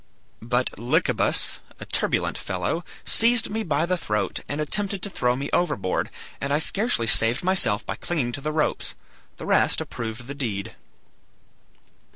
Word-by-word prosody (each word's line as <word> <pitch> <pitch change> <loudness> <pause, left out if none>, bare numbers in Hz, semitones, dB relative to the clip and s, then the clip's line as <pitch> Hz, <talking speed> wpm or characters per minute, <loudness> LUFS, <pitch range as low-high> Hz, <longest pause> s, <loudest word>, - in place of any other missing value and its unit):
But 120 -2 -1
Lycabas, 120 +2 +2 0.2
a - - -7
turbulent - - 0
fellow, 95 - -2 0.2
seized 230 -1 +3
me 220 +1 -1
by 155 -5 +1
the 180 +1 0
throat 105 - -1
and 145 - -2
attempted 195 +5 -1
to 200 - -3
throw 125 -6 +1
me 140 +2 -3
overboard, 100 - 0 0.3
and 140 - -2
I 145 - +4
scarcely 195 - +1
saved 115 - +4
myself 180 - +4
by - - -4
clinging 145 -9 -1
to 140 - -5
the 155 +2 -2
ropes. 155 0 -1 0.4
The - - -7
rest - - +3
approved 115 +1 -5
the 140 - -6
deed. 110 -9 -3
140 Hz, 155 wpm, -25 LUFS, 115-175 Hz, 0.4 s, I